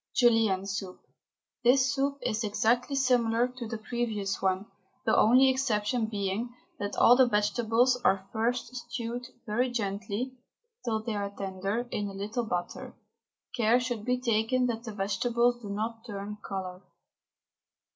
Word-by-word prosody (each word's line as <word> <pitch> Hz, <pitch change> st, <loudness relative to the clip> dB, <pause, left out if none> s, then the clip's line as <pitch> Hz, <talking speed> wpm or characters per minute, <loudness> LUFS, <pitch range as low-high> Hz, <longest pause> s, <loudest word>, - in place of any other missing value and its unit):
JULIENNE 225 Hz, -6 st, +3 dB
SOUP. 195 Hz, -2 st, -5 dB, 0.6 s
This 260 Hz, +2 st, +4 dB
soup 280 Hz, 0 st, 0 dB
is 225 Hz, -1 st, -1 dB
exactly 240 Hz, +6 st, +1 dB
similar 245 Hz, -3 st, +3 dB
to 250 Hz, -2 st, -7 dB
the 225 Hz, 0 st, -4 dB
previous 215 Hz, -3 st, -2 dB
one, 190 Hz, +1 st, +1 dB, 0.4 s
the -, -, +3 dB
only 255 Hz, +4 st, +6 dB
exception 240 Hz, -3 st, +1 dB
being 210 Hz, +3 st, -3 dB, 0.2 s
that 205 Hz, -, -3 dB
all 245 Hz, -, +7 dB
the 260 Hz, 0 st, +5 dB
vegetables 235 Hz, +3 st, +2 dB
are 195 Hz, 0 st, +2 dB
first 235 Hz, +3 st, -1 dB
stewed 240 Hz, 0 st, -5 dB, 0.2 s
very 240 Hz, +4 st, +1 dB
gently, 215 Hz, +2 st, -3 dB, 0.5 s
till 220 Hz, -2 st, -1 dB
they 225 Hz, -1 st, -3 dB
are 200 Hz, -1 st, -2 dB
tender, 200 Hz, +4 st, -3 dB
in 205 Hz, -1 st, -2 dB
a -, -, -8 dB
little 215 Hz, +5 st, -3 dB
butter. 175 Hz, -4 st, -4 dB, 0.6 s
Care 235 Hz, 0 st, +4 dB
should 245 Hz, -4 st, -3 dB
be 250 Hz, +2 st, 0 dB
taken 240 Hz, +1 st, +1 dB
that 235 Hz, -1 st, -2 dB
the 225 Hz, -, -5 dB
vegetables 235 Hz, +5 st, +1 dB
do 205 Hz, -, -7 dB
not 225 Hz, +3 st, -3 dB
turn 205 Hz, 0 st, -6 dB
colour. 185 Hz, -1 st, -5 dB
225 Hz, 145 wpm, -29 LUFS, 205-245 Hz, 0.6 s, all